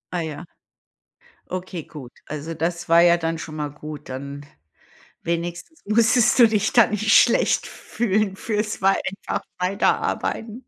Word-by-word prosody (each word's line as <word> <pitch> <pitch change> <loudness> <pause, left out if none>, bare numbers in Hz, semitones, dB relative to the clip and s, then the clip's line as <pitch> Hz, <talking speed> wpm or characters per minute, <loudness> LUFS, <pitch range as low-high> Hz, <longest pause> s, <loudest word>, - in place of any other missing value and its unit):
Ah 175 - 0
ja. 160 +2 -6 1.0
Okay, 185 -2 -5
gut. 140 -5 -11
Also, 155 +2 -6
das 170 +2 -3
war 165 +1 +6
ja 170 0 +6
dann 165 -1 -2
schon 155 0 -8
mal 150 - -2
gut, 150 -1 -9
dann 140 +2 -7 0.8
wenigstens 170 - -4
musstest 230 +3 +3
du 235 - +9
dich 220 -1 0
da 235 -3 +6
nicht 215 +1 -1
schlecht 235 - +4
fühlen 205 -3 -2
für's 210 -2 -3
wei 195 +1 +4 0.3
einfach - - -2 0.2
weiterarbeiten. 210 +4 -1
175 Hz, 140 wpm, -22 LUFS, 160-215 Hz, 1.0 s, du